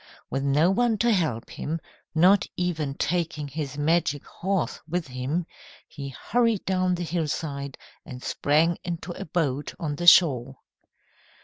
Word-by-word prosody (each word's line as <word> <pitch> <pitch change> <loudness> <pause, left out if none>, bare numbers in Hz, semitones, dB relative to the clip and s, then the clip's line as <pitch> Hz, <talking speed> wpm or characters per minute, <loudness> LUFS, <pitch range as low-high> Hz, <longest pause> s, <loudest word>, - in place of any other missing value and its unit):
With 135 - -1
no 150 +6 +3
one 235 +2 +2
to 235 +3 +3
help 155 - 0
him, 160 +2 -3 0.4
not 185 +5 +5
even 160 -6 -1
taking 155 -2 -1
his 145 0 -5
magic 145 -1 +1
horse 190 -2 -2
with 175 0 -2
him, 130 +7 -2 0.4
he 140 -2 -7
hurried 230 - 0
down 185 -1 +1
the 175 - -3
hillside 150 -4 -3 0.3
and 125 0 -9
sprang 160 +4 +2
into 175 0 -4
a - - -6
boat 145 -4 -1
on 150 -5 -3
the 175 - -3
shore. 135 -7 +6
160 Hz, 140 wpm, -26 LUFS, 140-180 Hz, 0.4 s, shore